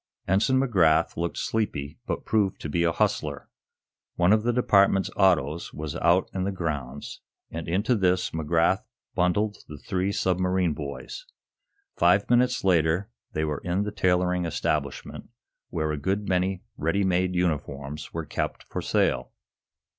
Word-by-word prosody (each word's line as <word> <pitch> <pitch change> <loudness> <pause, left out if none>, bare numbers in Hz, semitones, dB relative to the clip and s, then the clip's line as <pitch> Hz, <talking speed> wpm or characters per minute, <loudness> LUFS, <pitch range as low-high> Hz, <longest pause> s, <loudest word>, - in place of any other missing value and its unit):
Ensign 105 +8 +3
McGrath 85 -11 +3
looked 85 +1 -3
sleepy, 75 -10 -2
but - - -3
proved 105 -4 +1
to 75 - -4
be 85 +4 +1
a 85 - +3
hustler. - - -1 0.7
One 90 +3 +4
of 110 - +3
the 120 +2 +1
Department's 100 -5 +3
autos 85 -5 +2
was 75 -2 -5
out 85 +3 +3
in 95 - -1
the 100 - -1
grounds, 75 -7 -5 0.3
and 85 0 -5
into 100 +9 +1
this 90 -4 +1
McGrath 80 +3 +1 0.3
bundled 100 +4 +1
the 75 - -9
three 95 +6 -1
submarine 90 -3 +1
boys. 75 - -7 0.7
Five - - +4
minutes 125 +1 +3
later 90 +3 +2 0.2
they 80 0 0
were 75 -2 -3
in 90 +3 0
the 105 - -3
tailoring 90 -3 +1
establishment, 75 -3 -3 0.4
where 80 -3 -1
a 75 - -2
good 100 +7 -1
many 95 0 0
ready 80 +6 +1
made 90 0 +1
uniforms 75 -4 -2
were 80 -1 -4
kept 75 - -3
for - - -5
sale. - - 0
90 Hz, 145 wpm, -26 LUFS, 80-95 Hz, 0.7 s, One